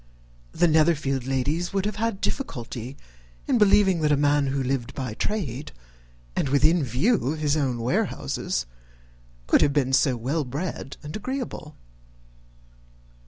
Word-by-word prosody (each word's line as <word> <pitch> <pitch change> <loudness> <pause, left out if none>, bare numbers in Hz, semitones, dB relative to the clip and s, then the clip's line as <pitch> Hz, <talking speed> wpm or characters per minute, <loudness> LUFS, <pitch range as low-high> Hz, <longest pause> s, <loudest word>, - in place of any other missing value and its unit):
The 175 - +3
Netherfield 150 -5 +2
ladies 145 +7 -1
would 195 0 0
have 210 0 -2
had 225 -2 -1
difficulty 125 - -4 0.5
in 240 - +2
believing 195 -4 +4
that 150 -1 +2
a 145 - +4
man 145 0 +2
who 135 0 -1
lived 130 -1 -2
by 130 -5 -4
trade, 145 - -3 0.6
and 140 - 0
within 155 +4 +4
view 135 - +1
of - - -6
his 150 -1 +1
own 135 -5 0
warehouses, 115 - -1 0.8
could - - +4
have 140 - +3
been 135 -2 +1
so 130 -2 +3
well 140 +7 -1
bred 140 +1 -5
and 150 +2 -7
agreeable. 235 - -5
145 Hz, 140 wpm, -25 LUFS, 130-175 Hz, 0.8 s, believing